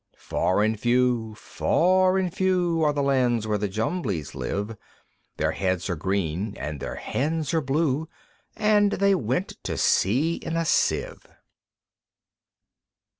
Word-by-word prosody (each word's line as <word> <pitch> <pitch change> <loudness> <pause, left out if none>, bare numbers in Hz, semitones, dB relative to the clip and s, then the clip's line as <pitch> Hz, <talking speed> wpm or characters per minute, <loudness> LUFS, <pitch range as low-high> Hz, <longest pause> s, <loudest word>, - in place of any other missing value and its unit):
Far 100 +3 0
and 110 0 0
few, 120 -2 +1
far 185 - +2
and 185 -3 -1
few, 180 -3 +1
Are 150 - +3
the 145 -1 -1
lands 125 -5 +2
where 105 -1 0
the 105 - -1
Jumblies 105 - -2
live; 105 +3 -3 0.6
Their - - +1
heads 95 0 -1
are - - -1
green, 95 +3 -2
and 75 0 -5
their - - -5
hands 155 +1 -2
are 160 - +2
blue, 150 +2 0 0.5
And 210 -1 +3
they 200 +1 +3
went 135 - -2
to - - -3
sea 140 - +2
in 165 - -4
a 165 - 0
Sieve. - - 0
130 Hz, 135 wpm, -25 LUFS, 105-165 Hz, 0.6 s, Are